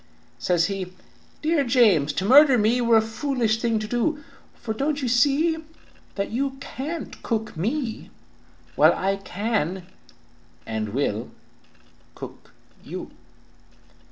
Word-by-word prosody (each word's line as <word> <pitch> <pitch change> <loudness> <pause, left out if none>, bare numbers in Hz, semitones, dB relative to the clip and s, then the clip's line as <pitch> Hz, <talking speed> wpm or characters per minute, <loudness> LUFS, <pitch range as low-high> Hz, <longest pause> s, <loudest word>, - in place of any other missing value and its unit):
"Says 175 -2 +2
he, 190 -2 -4 0.5
'Dear 315 -2 +2
James, 220 - +4
to 190 - -2
murder 270 +3 +7
me 230 +3 +2
Were 235 -1 +5
a - - +5
foolish 225 -1 -1
thing 230 -2 +1
to 215 0 -3
do, 290 +7 -1 0.3
For 220 -2 -4
don't 280 +6 -1
you - - 0
see 285 +7 +3 0.6
that 200 - -2
you 270 +3 -2
can't 295 +5 -6
cook 220 -2 -2
me, 230 - -3 0.7
While - - +6
I 195 +1 0
can 190 -3 -2 0.8
and 110 -1 -3
will 110 -2 -2 0.9
cook - - -10 0.3
you!' - - -7
225 Hz, 125 wpm, -24 LUFS, 195-270 Hz, 0.9 s, murder